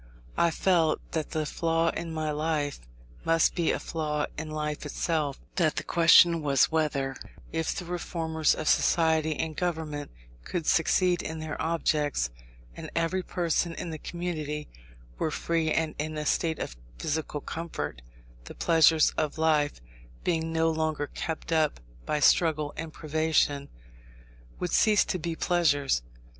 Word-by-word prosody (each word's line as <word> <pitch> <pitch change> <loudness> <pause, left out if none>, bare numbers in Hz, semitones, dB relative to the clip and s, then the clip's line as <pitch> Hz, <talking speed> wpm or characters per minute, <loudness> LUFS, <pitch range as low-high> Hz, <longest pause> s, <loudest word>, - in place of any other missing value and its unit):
I 170 - +3
felt 165 -2 +2
that 155 -2 -2
the 155 -2 -1
flaw 165 +1 +1
in 165 0 -4
my 155 -1 -2
life, 150 -1 -1 0.4
must 165 -1 +3
be 170 -2 +1
a - - 0
flaw 150 -2 -2
in 155 0 -5
life 150 -1 -3
itself; 150 -1 -1 0.2
that 160 -5 +2
the - - -2
question 170 0 +6
was, 140 -1 +3
whether, 140 -4 0 0.4
if 160 0 -1
the 180 - -5
reformers 165 -2 0
of 155 - -4
society 160 -2 +3
and 160 0 -3
government 155 -4 -3 0.3
could 170 - -3
succeed 175 +2 +3
in 160 - -5
their 155 -1 -5
objects, 150 - 0 0.4
and - - -7
every 165 +3 +1
person 170 -1 -1
in 170 - -5
the 155 - -6
community 155 -4 -4 0.5
were - - +1
free 160 +1 0
and 160 -1 0
in 155 +1 -3
a 150 - -3
state 160 +1 +1
of - - -5 0.2
physical 150 - -2
comfort, 140 - -5 0.4
the - - -9
pleasures 160 -1 +5
of 155 -1 -1
life, 150 - +2 0.4
being 165 -2 0
no 165 0 +2
longer 155 -2 -1
kept 160 +3 -5
up 155 - +2 0.3
by 150 - 0
struggle 155 -1 +3
and 165 0 -5
privation, 155 -2 0 0.9
would 180 - -3
cease 215 -3 +4
to 185 - -2
be 165 +1 -3
pleasures. 145 - +2
160 Hz, 150 wpm, -28 LUFS, 150-165 Hz, 0.9 s, question